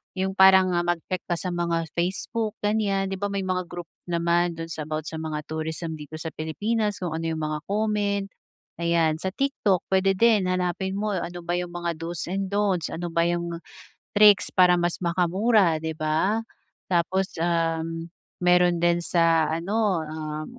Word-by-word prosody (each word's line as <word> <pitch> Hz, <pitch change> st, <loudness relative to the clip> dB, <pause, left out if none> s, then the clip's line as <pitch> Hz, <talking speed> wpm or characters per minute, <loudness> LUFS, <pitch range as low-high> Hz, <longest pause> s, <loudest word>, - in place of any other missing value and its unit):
yung 190 Hz, 0 st, -1 dB
parang 190 Hz, -1 st, +7 dB
mag-check 175 Hz, +1 st, -1 dB
ka 175 Hz, -, 0 dB
sa 180 Hz, +2 st, -4 dB
mga 170 Hz, -1 st, 0 dB
Facebook, 195 Hz, +5 st, -2 dB
ganyan. 200 Hz, -2 st, 0 dB
'Di 190 Hz, -, -4 dB
ba 205 Hz, -, -1 dB
may 200 Hz, -1 st, -2 dB
mga 185 Hz, -1 st, -2 dB
group 175 Hz, -2 st, -8 dB, 0.2 s
naman 170 Hz, 0 st, +1 dB
dun 165 Hz, 0 st, -6 dB
sa 155 Hz, -2 st, -5 dB
about 155 Hz, 0 st, -3 dB
sa 160 Hz, +1 st, -6 dB
mga 155 Hz, -1 st, -4 dB
tourism 160 Hz, +1 st, -4 dB
dito 150 Hz, +1 st, -9 dB
sa 160 Hz, +1 st, -5 dB
Pilipinas 210 Hz, +8 st, -1 dB
kung 175 Hz, -, -2 dB
ano 165 Hz, +1 st, -3 dB
'yung 160 Hz, -1 st, -2 dB
mga 155 Hz, 0 st, -2 dB
comment, 205 Hz, -1 st, 0 dB, 0.6 s
ayan. 165 Hz, -2 st, +2 dB
Sa 190 Hz, +3 st, -4 dB
TikTok 245 Hz, -9 st, +1 dB
puwede 190 Hz, 0 st, +3 dB
din, 215 Hz, -2 st, +4 dB
hanapin 185 Hz, +1 st, -1 dB
mo 210 Hz, +1 st, -1 dB
ano 175 Hz, -2 st, -4 dB
ba 175 Hz, +1 st, -1 dB
'yung 175 Hz, -1 st, -6 dB
mga 175 Hz, -1 st, -2 dB
do's 165 Hz, 0 st, -4 dB
and 195 Hz, +1 st, -1 dB
don'ts, 200 Hz, -4 st, 0 dB
ano 170 Hz, +1 st, -5 dB
ba 170 Hz, +1 st, +2 dB
'yung 170 Hz, -1 st, -2 dB, 0.5 s
tricks 205 Hz, -1 st, +6 dB
para 180 Hz, -1 st, +5 dB
mas 175 Hz, +1 st, -1 dB
makamura, 180 Hz, 0 st, +2 dB
'di 160 Hz, -1 st, -4 dB
ba. 175 Hz, +9 st, 0 dB, 0.4 s
Tapos, 185 Hz, +2 st, 0 dB
um, 165 Hz, 0 st, -1 dB, 0.2 s
meron 180 Hz, -1 st, +4 dB
din 175 Hz, 0 st, +2 dB
sa 165 Hz, -2 st, +3 dB
ano, 195 Hz, -1 st, 0 dB
ah, 155 Hz, 0 st, -5 dB
175 Hz, 170 wpm, -25 LUFS, 165-190 Hz, 0.6 s, parang